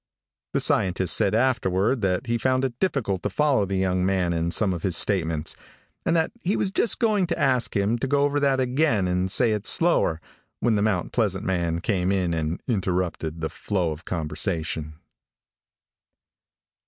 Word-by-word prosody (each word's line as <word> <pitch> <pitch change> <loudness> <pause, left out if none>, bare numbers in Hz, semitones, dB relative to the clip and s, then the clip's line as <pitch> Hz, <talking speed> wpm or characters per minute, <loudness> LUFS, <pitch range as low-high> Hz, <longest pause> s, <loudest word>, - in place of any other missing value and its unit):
The - - +2
scientist 90 -2 +2
said 100 - +2
afterward 115 -2 +1
that 95 -2 0
he 120 0 -1
found 130 +1 +1
it 120 -2 -5
difficult 120 - -1
to - - -2
follow 145 -8 +2
the 95 - -2
young 95 -1 0
man 95 -2 +1
in 85 0 -1
some 95 +2 +2
of 85 - -5
his 90 -2 0
statements 80 -6 0 0.5
and - - +2
that 160 -1 +1
he 190 +4 0
was 190 - -1
just 215 +3 +1
going 210 -6 +1
to 170 - -2
ask 125 -3 +1
him 105 +4 +1
to 135 - -1
go 140 +1 +2
over 145 0 +1
that 140 -2 +2
again 130 -6 +1
and 90 +1 0
say 115 +4 +3
it 105 0 -2
slower, 165 - +2 0.4
when 120 - +2
the 105 - +1
Mount 100 -5 0
Pleasant 105 -3 0
man 85 -3 -1
came 95 -2 0
in 90 -3 0
and 80 +1 -3
interrupted 90 - -2
the 80 - -2
flow 90 -1 -2
of 80 +3 -8
conversation. 80 -2 -3
100 Hz, 180 wpm, -24 LUFS, 90-130 Hz, 0.5 s, say